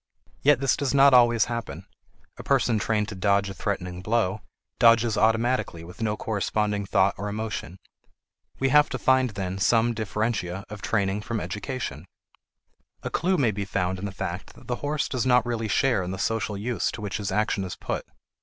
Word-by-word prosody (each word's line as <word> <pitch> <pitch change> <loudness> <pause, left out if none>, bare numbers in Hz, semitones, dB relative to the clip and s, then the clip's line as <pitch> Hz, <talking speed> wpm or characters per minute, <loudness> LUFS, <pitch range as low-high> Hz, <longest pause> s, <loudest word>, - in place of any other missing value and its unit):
Yet 145 -2 +4
this 135 -2 +3
does 140 -1 -1
not 140 0 +7
always 120 -3 +5
happen; 115 -1 -5 0.5
a - - -9
person 125 -5 +2
trained 105 -1 0
to - - -6
dodge 100 +1 +2
a - - -7
threatening 90 -2 -4
blow, 105 -1 0 0.4
dodges 115 -1 +5
automatically 110 -5 +1
with 90 +7 -11
no 105 -1 0
corresponding 105 -1 -1
thought 95 -1 +3
or 105 +1 -3
emotion. 105 -4 -5 0.8
We 135 - +1
have 150 +2 +5
to 130 - -3
find, 130 0 +3
then, 95 -2 -4
some 115 +4 +3
differentia 105 -3 -2
of 105 -2 -8
training 100 -2 0
from 115 +1 -3
education. 95 - -5 1.0
A - - -4
clew 185 +2 +1
may 120 -6 +2
be 100 0 -3
found 95 -2 -2
in 100 - -4
the 100 - -4
fact 90 0 -6
that - - -16
the 120 -1 -2
horse 145 0 -1
does 130 -1 -2
not 125 -1 +4
really 115 -2 -2
share 120 -1 +2
in 90 - -4
the 95 - -4
social 110 0 -1
use 115 +4 -1
to - - -7
which 100 -1 -3
his 100 -2 -3
action 105 0 0
is 90 - -5
put. - - -4
110 Hz, 190 wpm, -25 LUFS, 100-120 Hz, 1.0 s, not